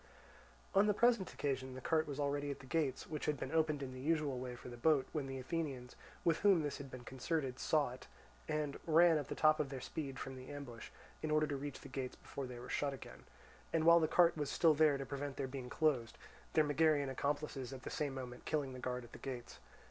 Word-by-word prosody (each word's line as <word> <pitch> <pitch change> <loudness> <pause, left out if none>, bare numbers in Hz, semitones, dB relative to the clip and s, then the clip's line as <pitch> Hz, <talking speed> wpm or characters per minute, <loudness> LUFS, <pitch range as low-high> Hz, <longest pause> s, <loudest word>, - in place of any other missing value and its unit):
On 200 +1 +5
the 210 - +3
present 235 -5 +3
occasion 130 -2 -2
the - - -5
cart 155 +4 +1
was 145 -1 -5
already 145 0 0
at 140 - -3
the 135 - -12
gates, 145 -2 0
which 150 -2 -4
had 150 - +1
been 135 - -4
opened 155 -3 +2
in 130 -1 -5
the 130 - -8
usual 150 -3 +1
way 125 -1 -5
for 125 - -11
the 120 - -7
boat, 140 +2 +3
when 150 -3 -2
the 135 0 -4
Athenians, 130 -3 -3 0.3
with 165 -2 +3
whom 195 -6 +5
this 145 0 -3
had 140 -1 -7
been 130 -1 -8
concerted, 130 +1 -2
saw 150 -5 +2
it, 125 - -10 0.4
and 150 -2 -1
ran 165 0 +6
at 145 - -5
the - - -4
top 155 0 +5
of 150 -3 0
their 135 -1 -5
speed 135 +1 -5
from 135 0 -5
the 130 0 -10
ambush 130 -6 -7 0.3
in 155 - -2
order 155 0 +3
to 145 - -2
reach 140 +1 -5
the - - -9
gates 130 -2 -4
before 135 -2 -6
they 125 -1 -7
were 120 +1 -8
shut 140 -1 0
again, - - -11 0.5
and 165 -1 +2
while 170 +1 +8
the 160 - +2
cart 170 +1 +5
was 145 -3 -2
still 165 -2 +5
there 150 -1 +4
to 135 - -4
prevent 140 0 -4
their 135 - -1
being 130 -1 -6
closed; 130 -8 +1 0.4
their 155 - +5
Megarian 145 -2 +3
accomplices 140 -2 -2
at 130 -1 -8
the - - -5
same 145 -3 -2
moment 125 -2 -7
killing 145 -4 -1
the 130 - -7
guard 125 0 -3
at 120 - -13
the - - -10
gates. 125 -3 -6
140 Hz, 240 wpm, -37 LUFS, 130-155 Hz, 0.5 s, while